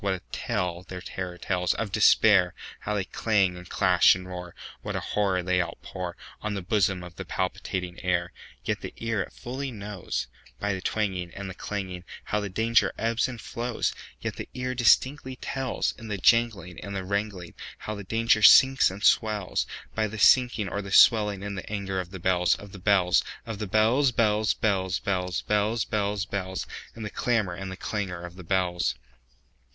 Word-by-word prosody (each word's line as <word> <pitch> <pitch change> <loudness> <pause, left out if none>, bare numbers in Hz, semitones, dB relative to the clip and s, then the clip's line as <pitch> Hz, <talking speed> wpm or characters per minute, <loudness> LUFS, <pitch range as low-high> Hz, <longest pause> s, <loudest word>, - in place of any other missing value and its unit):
What 95 -1 +1
a 90 - -9
tale 90 -7 -2
their 90 - -6
terror 90 -1 -6
tellsOf 95 +3 -1
Despair! 100 -3 +5 0.2
How 105 - -3
they 100 - 0
clang, 100 -2 +1
and 90 0 -11
clash, - - +5
and 90 0 -8
roar! 90 -1 -7 0.3
What - - -4
a - - 0
horror 95 -3 0
they 90 0 +1
outpourOn 90 +1 -4 0.4
the 100 - -4
bosom 95 -1 +1
of 90 0 -11
the - - -4
palpitating 90 -1 -3
air! 90 -1 0 0.3
Yet - - -1
the - - -7
ear 115 -3 -1
it - - -5
fully 135 +3 -5
knows, 105 -4 -4 0.3
By 100 0 0
the 95 - -4
twangingAnd 95 -2 -2
the 95 - -6
clanging, 95 -2 -5 0.2
How 105 - -1
the 100 -1 -4
danger 115 +4 +2
ebbs 115 +2 +1
and 125 -3 -7
flows; 120 +2 -2 0.3
Yet - - -4
the - - -6
ear 125 0 -2
distinctly 130 +2 +3
tells, 135 0 -2
In 115 - -9
the 105 -2 -3
janglingAnd 100 -4 +1
the 95 -1 -3
wrangling, 100 -3 -3 0.2
How 105 - -5
the 100 -1 -7
danger 115 +2 +2
sinks 130 +5 +7
and 95 +2 -8
swells,—By 110 +1 +1
the 110 +1 -7
sinking 115 0 +4
or 100 - -3
the 100 - -8
swelling 105 -2 +5
in 100 0 -4
the 95 - -7
anger 100 -2 -2
of 90 -1 -5
the 95 - -7
bells, 90 0 +2
Of 100 -1 -11
the 95 - -10
bells, 95 -2 +3 0.2
Of 115 -3 -6
the 105 - -3
bells, 115 +7 +3
bells, 110 -2 +2
bells, 95 -3 0
bells, 90 -2 -1
Bells, 105 +2 +1
bells, 105 -1 -1
bells—In 100 +3 -6
the 105 - -5
clamor 110 -7 0
and 95 +2 -6
the 95 - -7
clangor 95 -6 -4
of 85 0 -10
the 90 - -10
bells! 90 -1 0
100 Hz, 180 wpm, -27 LUFS, 90-110 Hz, 0.4 s, sinks